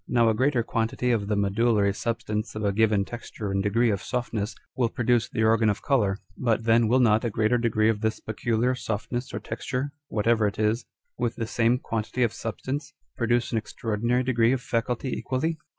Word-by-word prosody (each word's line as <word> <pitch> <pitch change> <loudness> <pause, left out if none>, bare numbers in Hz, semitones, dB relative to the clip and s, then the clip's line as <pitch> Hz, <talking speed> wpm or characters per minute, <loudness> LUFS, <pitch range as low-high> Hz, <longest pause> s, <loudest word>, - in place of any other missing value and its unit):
Now 120 -2 +3
a - - +3
greater 130 +1 +2
quantity 115 +2 -1
of 105 -4 0
the 105 - +1
medullary 100 +1 +2
substanee 110 -1 -3
of 110 - -3
a 100 - +3
given 105 -1 +2
texture 110 -3 -6
and 95 0 +1
degree 115 +4 +2
of 100 -2 -2
softness 115 -2 -3 0.2
will 120 -3 +1
produce 120 0 +1
the 110 - -1
organ 110 0 +4
of 100 - -2
colour: 105 -8 +2 0.2
but 115 -2 0
then 115 0 +4
will 125 +4 +3
not 115 -2 +4
a 120 - 0
greater 110 +3 +1
degree 110 -2 +2
of 110 -2 +1
this 110 -1 0
peculiar 115 +3 0
softness 120 +1 -3
or - - -3
texture 135 +2 -4 0.2
(whatever 110 0 +2
it 100 - -4
is) 110 +3 +1 0.3
with 120 -2 0
the 115 - -3
same 115 +2 +2
quantity 115 +1 -2
of 115 - +1
substance, 140 +6 -5 0.2
produce 120 0 +1
an 115 - +1
extraordinary 115 +3 -1
degree 120 -1 +3
of 130 - -1
faculty 120 +2 -1
equally 155 +5 -2
115 Hz, 195 wpm, -26 LUFS, 110-120 Hz, 0.3 s, organ